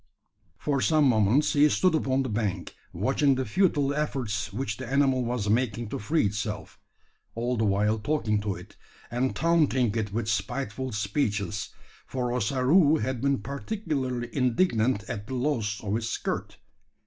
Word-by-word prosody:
For 140 -3 -1
some 155 +1 +3
moments 120 +3 +3
he 150 +1 +5
stood 185 +4 +2
upon 135 -4 +1
the 130 - -3
bank, 105 -3 -2 0.2
watching 140 -2 +2
the 130 0 -1
futile 145 - +2
efforts 120 -8 -2
which 105 -1 -3
the 130 - -6
animal 135 -1 +2
was 120 -3 -2
making 115 0 0
to - - -4
free 150 +6 +1
itself, 105 +1 -4 0.6
all 120 +2 -1
the 110 -1 +1
while 105 +2 +2
talking 110 -4 0
to 100 -2 -2
it, 90 +4 -12 0.4
and 125 +2 0
taunting 150 -9 +2
it 110 -3 -1
with 110 +1 -2
spiteful 130 +3 -2
speeches 105 -1 -1 0.4
for 125 -2 -2
Ossaroo 135 - +3
had 130 -5 -2
been 140 -6 +1
particularly 135 - -3
indignant 125 - +2
at 105 -2 -5
the 130 - -4
loss 120 -6 -1
of 100 -1 -2
his 115 0 -1
skirt. - - -3
125 Hz, 155 wpm, -27 LUFS, 105-140 Hz, 0.6 s, he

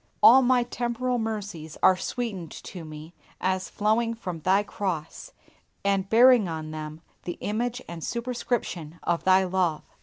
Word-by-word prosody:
All 260 +3 +9
my 250 -1 +3
temporal 245 +1 -2
mercies 205 -8 -5
are 185 - +7
sweetened 195 -4 -4
to 180 -3 -8
me 155 +1 -10 0.3
as 185 0 -1
flowing 225 +2 +1
from 180 -7 -6
Thy 190 +5 +3
cross, 180 -6 -4 0.5
and 195 -1 +1
bearing 240 -2 +6
on 155 -1 -5
them 155 +1 -7 0.2
the 175 - -4
image 240 +4 -2
and 170 -2 -7
superscription 235 -9 -3
of 170 -1 -1
Thy 190 0 +5
love. 180 -4 0
190 Hz, 145 wpm, -26 LUFS, 170-235 Hz, 0.5 s, All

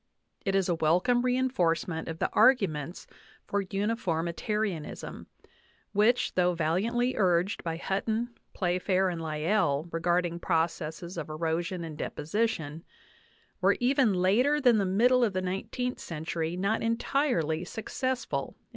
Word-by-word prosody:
It 195 -1 0
was 195 -2 +2
a 175 - +2
wel 160 +1 +3
come 245 +5 +2
reinforcement 185 -11 0
of 165 - -4
the - - -1
arguments 180 - +3 0.4
for 200 0 -1
unjf 205 +4 -2
nrrnitui 175 +3 -1 0.3
iuiiiLTn, - - -11 0.7
which, 215 +4 +3
though 180 -1 +2
valiantly 215 +10 +1
urged 185 0 +1
by 165 -1 -3
Hntton^ 220 +6 -1 0.3
Playf 180 -1 -1
ajr, 190 -1 +2
and 170 -1 -5
Lyell 155 -1 0
regarding 170 +1 0
processes 165 0 -2
of 155 - -6
erosion 165 +3 -2
and 160 -2 -7
deposition, 165 -4 -2 0.8
were - - +4
even 250 -4 +3
later 230 +12 +3
than 245 -6 +4
the 200 - +1
middle 245 +6 +4
of 215 -4 +1
the 185 - -1
nineteenth 200 +7 -3
century 165 +1 -3
not 200 +4 0
entirely 230 - 0
success 250 +6 -3
ful - - -3
in. - - -40
185 Hz, 140 wpm, -29 LUFS, 165-225 Hz, 0.8 s, were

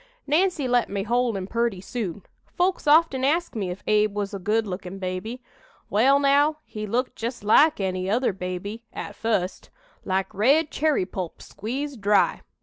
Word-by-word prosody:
Nancy 315 -1 +1
let 245 -1 +2
me 200 0 -2
hold 240 0 +1
him 190 - -4
purty 230 -1 -1
soon. 195 -2 -5 0.2
Folks 360 -2 -1
often 295 -3 +4
ask 320 +2 +1
me 200 -4 -2
if 180 +2 -7
Abe 210 -1 +2
was 205 -1 -3
a 200 - -4
good 215 +4 +1
lookin' 185 -1 -6
baby. 195 +7 -5 0.5
Well, 255 +7 +5
now, 285 +2 +3
he 215 0 -6
looked 245 +5 -1
just 235 -1 -5
like 285 +8 +5
any 185 -1 -2
other 235 +1 +1
baby, 190 +5 -5
at - - -6
fust 200 -5 -2 0.3
like 190 +2 -1
red 280 +10 +3
cherry 300 -10 +1
pulp 180 -2 -6
squeezed 260 +3 -5
dry. 205 0 +3
220 Hz, 165 wpm, -25 LUFS, 195-270 Hz, 0.5 s, Well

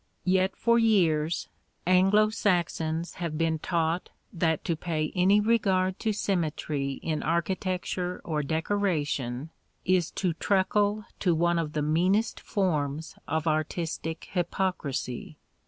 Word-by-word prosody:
Yet 185 +1 +2
for 235 0 +3
years 170 -8 +2 0.4
Anglo 195 +4 +4
Saxons 170 -5 0
have 165 -3 -2
been 160 -1 +1
taught 165 +1 -1 0.2
that 160 -2 0
to 170 - +1
pay 155 -2 -2
any 190 +3 +4
regard 195 -4 +2
to 220 - 0
symmetry 155 -8 -1
in 155 -2 -1
architecture 180 +1 -1
or 155 -3 -1
decoration 155 -5 -1 0.3
is 180 -2 +2
to 180 -4 0
truckle 205 +4 +1
to 175 -4 +2
one 170 +1 +2
of 155 -2 -3
the 150 - 0
meanest 185 +9 +2
forms 160 -5 -1
of 160 0 -1
artistic 160 +1 -2
hypocrisy. 170 -8 -2
170 Hz, 120 wpm, -28 LUFS, 155-190 Hz, 0.4 s, Anglo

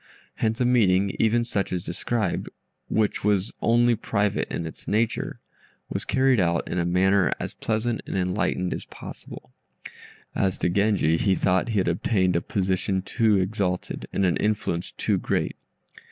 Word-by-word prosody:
Hence 110 0 0
a 125 - +2
meeting 100 -6 +3
even 115 +1 +3
such 105 -4 -2
as 90 - -1
above - - -20
described, 105 +2 -2 0.4
which 110 -2 0
was 105 0 +1
only 120 +1 +4
private 105 -2 -1
in 85 - -3
its 80 - -9
nature, 110 +2 0 0.5
was - - -3
carried 130 -2 +3
out 85 -2 +1
in 90 - -2
a 85 - 0
manner 95 +2 +3
as - - -4
pleasant 110 +1 -1
and - - -2
enlightened 90 0 0
as - - -6
possible. - - -11 0.8
As 95 -2 0
to - - 0
Genji, 100 -4 +2
he 95 +2 +2
thought 95 +4 +1
he 110 - -1
had 95 - +2
obtained 90 +1 +1
a 85 - +2
position 95 0 -1
too 110 +1 +2
exalted, 95 -1 -2
and 100 - +1
an 90 - +2
influence 100 -5 -1
too - - 0
great. - - -1
100 Hz, 165 wpm, -25 LUFS, 90-110 Hz, 0.8 s, only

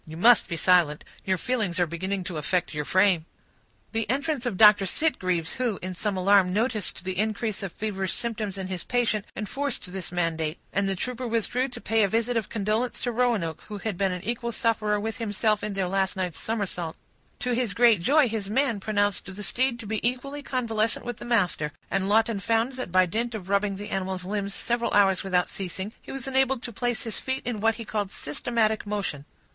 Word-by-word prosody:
"You 160 0 -8
must 235 +6 +6
be 170 -3 -3
silent! 170 -4 +3 0.2
Your 190 -1 +2
feelings 210 -6 0
are 175 - +4
beginning 185 +4 -3
to 175 -2 -5
affect 175 +4 0
your 150 0 -2
frame." 185 -3 +3 0.6
The 225 -2 -1
entrance 275 0 0
of 195 - -2
Dr. 210 -2 +7
Sitgreaves, 185 - 0
who, 240 -6 +1
in 185 0 -3
some 200 +2 -1
alarm, 190 0 +4
noticed 215 -3 -1
the 185 0 -3
increase 215 0 -1
of 195 -3 -4
feverish 195 -2 -2
symptoms 215 -4 -3
in 190 - -4
his 185 -2 -4
patient, 230 -4 0
enforced 220 -3 -3
this 190 -3 -6
mandate; 165 -2 -1 0.2
and 200 0 +1
the 195 - 0
trooper 250 +5 -3
withdrew 235 +3 0
to 250 - -8
pay 225 0 +1
a 200 - +5
visit 230 +4 0
of 225 -4 -1
condolence 220 +3 -1
to 245 - 0
Roanoke, 225 -10 0
who 210 - -5
had 210 0 -3
been 195 +1 +1
an 180 -1 -4
equal 235 +2 -2
sufferer 215 -2 +1
with 220 +3 -4
himself 215 -1 +1
in 210 - -2
their 195 -2 -1
last 195 +1 0
night's 180 -3 -2
somersault. 190 -7 -2 0.4
To 250 - -2
his 235 -4 0
great 230 -6 +5
joy, 285 - +5
his 215 -3 -3
man 235 -1 +1
pronounced 205 -1 0
the 210 - -6
steed 250 +4 +1
to - - -9
be 215 +1 -1
equally 255 +4 -2
convalescent 230 -5 -1
with 240 -2 -4
the - - -9
master; 180 -10 +1 0.2
and 195 0 0
Lawton 220 0 +3
found 225 +5 +1
that 255 -8 -5
by 185 +1 +5
dint 230 +6 -2
of 190 -3 -7
rubbing 200 0 +1
the 205 +2 -7
animal's 190 -1 -2
limbs 200 0 -2
several 235 0 0
hours 195 -2 +5
without 180 -2 +2
ceasing, 190 +2 -5
he - - -10
was 270 -1 -5
enabled 265 -1 +2
to 235 - -6
place 240 +2 -1
his 225 - -4
feet 265 0 -3
in 240 -4 -2
what 225 +2 +3
he 230 - -7
called 210 -2 -2
systematic 220 +8 -1
motion. 195 -9 -3
210 Hz, 205 wpm, -26 LUFS, 185-235 Hz, 0.6 s, Dr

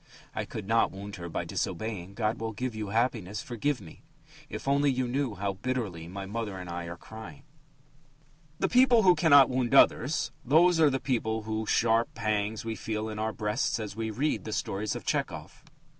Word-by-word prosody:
"I - - -3
could 105 -3 -7
not 115 +1 +3
wound 100 +1 -8
her 85 -1 -6
by - - -3
disobeying. 100 0 -4
God 110 +1 -1
will 110 0 -3
give 125 +2 -3
you 110 -1 -4
happiness. 110 -2 -1
Forgive 125 +4 -1
me. 85 -6 -13 0.5
If - - -7
only 140 +1 +3
you 130 -1 0
knew 130 -3 -1
how 100 +1 -2
bitterly 100 -6 -3
my 95 +2 -6
mother 105 -1 -4
and 90 -1 -7
I 85 0 -4
are 85 +1 -7
crying!" 110 -8 -11 1.1
The - - +1
people 250 -2 +5
who 180 -1 +7
cannot 145 -7 +7
wound 125 0 0
others 155 +3 +4
those 165 +6 +5
are 155 -2 +6
the 135 -1 -1
people 110 -4 -1
whose 110 0 -3
sharp 115 0 +2
pangs 110 -1 -1
we 115 -1 -2
feel 110 0 -3
in 105 0 -5
our 110 +1 0
breasts 110 +8 -1
as 105 -3 -5
we 110 0 -2
read 135 +8 -1
the 110 - -5
stories 105 +2 -2
of - - -7
Tchehov. - - -3
110 Hz, 190 wpm, -29 LUFS, 100-130 Hz, 1.1 s, who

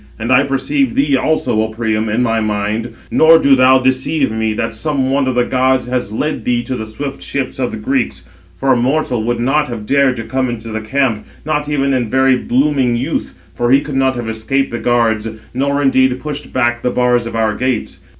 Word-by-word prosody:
And 115 +3 -3
I 125 +1 +6
perceive 135 -1 0
thee 140 0 +2
also, 130 -6 +1
O 110 - 0
Priam, 110 0 -2
in 115 +4 +1
my 115 -2 +1
mind, 110 +2 -2 0.2
nor 165 +1 +6
do 140 -4 +4
thou 130 0 +5
deceive 130 +2 0
me, 110 0 -1
that 115 +1 -3
some 135 +3 -1
one 135 -1 +1
of 130 - -1
the 125 - +3
gods 130 -1 +1
has 125 -4 -2
led 150 +8 -2
thee 120 -1 0
to 130 - -4
the 110 -3 -5
swift 135 +5 -6
ships 135 -2 -4
of 125 -2 0
the - - -6
Greeks; 125 +3 -2 0.3
for 135 -1 +2
a - - +2
mortal 125 -1 0
would 120 +1 -1
not 145 +5 +1
have 115 -3 -6
dared 140 +1 +2
to 115 - -5
come 130 +1 -1
into 115 -1 -6
the 110 0 -4
camp, 120 -1 -1 0.2
not 150 -1 -1
even 140 -2 +1
in 120 -4 0
very 130 +1 +3
blooming 130 0 +1
youth, 120 +3 -3 0.2
for 120 - -1
he 135 +2 +6
could 145 0 -7
not 135 -1 +2
have 120 -2 -4
escaped 110 +5 -1
the 120 - -3
guards, 115 -2 +1 0.2
nor 140 +2 0
indeed 130 -2 +2
pushed 150 0 -6
back 120 -2 0
the 125 - 0
bars 125 -1 +1
of 115 - -6
our 110 -1 +1
gates. 130 +2 -2
125 Hz, 220 wpm, -16 LUFS, 115-135 Hz, 0.3 s, I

